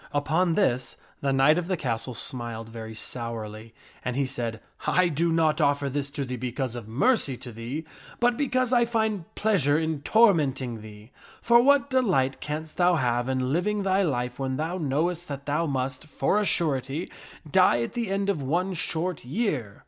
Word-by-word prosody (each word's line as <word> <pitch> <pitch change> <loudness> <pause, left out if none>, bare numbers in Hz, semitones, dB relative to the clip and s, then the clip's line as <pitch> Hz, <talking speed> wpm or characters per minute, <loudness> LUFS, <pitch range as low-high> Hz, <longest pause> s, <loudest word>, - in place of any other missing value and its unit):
Upon 160 +4 +2
this 130 -11 0 0.2
the 140 - 0
knight 135 +5 +4
of 175 - -4
the 185 -1 0
castle 120 -2 -2
smiled 115 -2 -3
very 110 -1 -8
sourly, 115 -1 -6 0.3
and 125 - -2
he 140 0 +1
said, 120 -4 -4 0.2
" - - -11
I 180 -1 +3
do 165 +2 +1
not 160 0 +2
offer 140 -1 +2
this 140 0 -2
to 140 - -1
thee 125 0 -4
because 125 +1 -3
of 120 -3 -7
mercy 135 - +2
to 120 - -8
thee, 120 +8 -5 0.3
but 240 0 +3
because 255 -2 0
I 240 -1 +5
find 220 -6 0
pleasure 175 -10 +2
in 160 -2 -1
tor 220 +6 +5
menting 135 - -2
thee. 105 +2 -13 0.3
For 235 0 +5
what 280 +1 +4
delight 185 - +2
canst 155 +1 -5
thou 180 0 +4
have 120 -3 0
in 130 0 0
living 205 +5 0
thy 190 0 +2
life 125 -7 -1
when 130 -1 -2
thou 165 +5 -2
knowest 165 +4 -1
that 140 -1 -6
thou 150 +3 0
must, 135 +1 -3
for 175 +7 +1
a 210 - 0
surety, 145 -2 0 0.4
die 150 -7 +4
at - - -5
the 235 -4 -2
end 195 0 -1
of 195 -7 0
one 175 +8 0
short 170 0 -2
year 130 - -2
145 Hz, 185 wpm, -26 LUFS, 125-185 Hz, 0.4 s, I